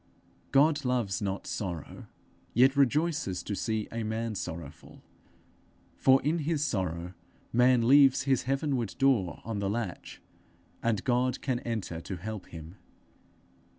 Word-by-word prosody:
God 150 +2 +4
loves 120 -8 0
not 100 -1 -3
sorrow, 85 -7 -5 0.5
yet 130 +4 +5
rejoices 140 - +1
to 105 - -4
see 110 +1 -2
a 115 - -3
man 110 +1 -2
sorrowful, 85 -6 -8 0.9
for 130 0 +5
in 160 +4 +1
his 155 -1 0
sorrow 90 - -2 0.4
man 125 -1 +4
leaves 135 0 +6
his 135 -2 +2
heavenward 135 - -1
door 125 -10 +2
on 110 -2 -3
the 100 -1 -1
latch, 105 -5 -4 0.6
and 115 -4 0
God 125 0 +1
can 130 -3 0
enter 110 -9 -4
to 95 - -6
help 105 +2 -7
him. 80 +3 -10
115 Hz, 130 wpm, -29 LUFS, 95-135 Hz, 0.9 s, leaves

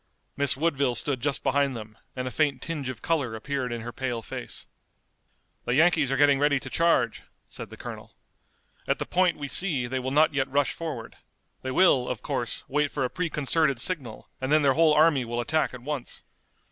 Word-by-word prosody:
Miss 140 -1 +1
Woodville 140 -5 +1
stood 130 +1 -1
just 145 +1 -1
behind 140 -3 +1
them, 110 -1 -9 0.2
and 125 0 -3
a - - -4
faint 145 -3 +1
tinge 145 -3 -4
of 130 - -7
color 140 -9 0
appeared 130 +2 -3
in 120 -1 -4
her 120 +1 -6
pale 120 -3 -3
face. - - -7 1.0
"The 120 - +1
Yankees 160 -3 +4
are 135 - +1
getting 140 -1 +5
ready 145 -1 +3
to - - -9
charge," 165 -9 +2 0.2
said - - -8
the - - -11
colonel. - - -9 0.7
"At - - +1
the - - -3
point 180 -2 +2
we 145 -1 -5
see 145 -5 +2
they 130 +2 -2
will 130 +1 -3
not 150 +3 +3
yet 135 -1 0
rush 140 +1 +1
forward. 145 -9 -6 0.4
They 130 - -4
will, 130 -3 +4
of 115 -5 -4
course, 120 -2 -3
wait 145 +1 +1
for 140 - -2
a 125 - -3
preconcerted 155 -5 0
signal, 130 -9 -3
and 130 +1 -2
then 155 0 +4
their 135 -1 +4
whole 155 +1 +4
army 150 -4 +4
will 120 0 -3
attack 155 +7 0
at 125 -1 -10
once. 145 -2 -5
140 Hz, 200 wpm, -26 LUFS, 125-150 Hz, 1.0 s, getting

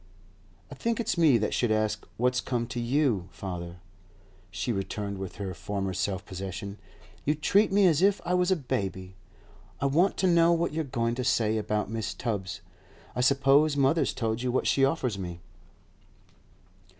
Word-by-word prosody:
'I - - -7
think 230 0 0
it's 225 -3 0
me 160 -8 +5
that 105 -1 -1
should 120 -3 +1
ask 110 0 0
what's 125 +1 +1
come 120 -2 -2
to 120 +1 -5
you, 120 - +1
father,' 85 -1 -6 0.7
she 110 +5 -3
returned 100 -1 -3
with 95 -2 -6
her 95 -2 -4
former 95 0 -3
self 95 +1 -2
possession. 95 +2 -6 0.4
'You 150 - +1
treat 195 +8 +3
me 200 0 +4
as 165 -3 +4
if 200 +1 +4
I 180 - 0
was 180 0 +2
a 190 - +4
baby. 100 - -3 0.7
I - - -1
want 165 +8 +2
to - - +1
know 170 -1 +5
what 170 -1 0
you're 160 +1 -1
going 115 -3 -1
to 125 +1 -3
say 110 -2 +2
about 105 0 -2
Mrs. 115 -1 -3
Tubbs. 100 -7 -3 0.5
I 125 - 0
suppose 140 +3 +4
mother's 140 +4 +3
told 110 -1 -1
you 125 0 -1
what 130 - 0
she 135 - +3
offers 135 -7 +1
me? 85 -2 -6
120 Hz, 175 wpm, -28 LUFS, 100-150 Hz, 0.7 s, me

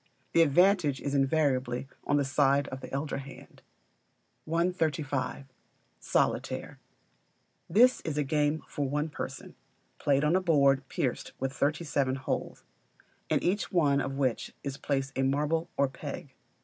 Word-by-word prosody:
The 170 - +5
advantage 165 -2 +4
is 140 - -3
invariably 135 -3 +1
or 145 - 0
the 145 -1 +2
side 140 +1 +2
of 130 0 -7
the - - -9
elder 140 +2 -2
hand. 140 0 -12 0.8
135. 155 -5 -1 0.5
Solitaire - - -1 0.9
This 250 +4 +5
is 150 -2 -4
a 150 - +2
game 150 +2 0
for 140 -2 -2
one 150 +3 -1
person, - - -7 0.5
played 140 0 +2
on 150 +4 +3
a 185 - +3
board 140 -6 +3
pierced 125 -3 -2
with 135 0 -2
thirty 145 +4 0
seven 140 -4 0
holes, 135 - -4 0.7
in - - +1
each 195 +4 0
one 145 -6 +3
of 135 0 -3
which 130 -4 -1
is 140 -1 -3
placed 135 -1 -2
a 135 - 0
marble 150 +5 0
or 140 - +3
peg. 130 -1 -8
145 Hz, 145 wpm, -29 LUFS, 135-155 Hz, 0.9 s, The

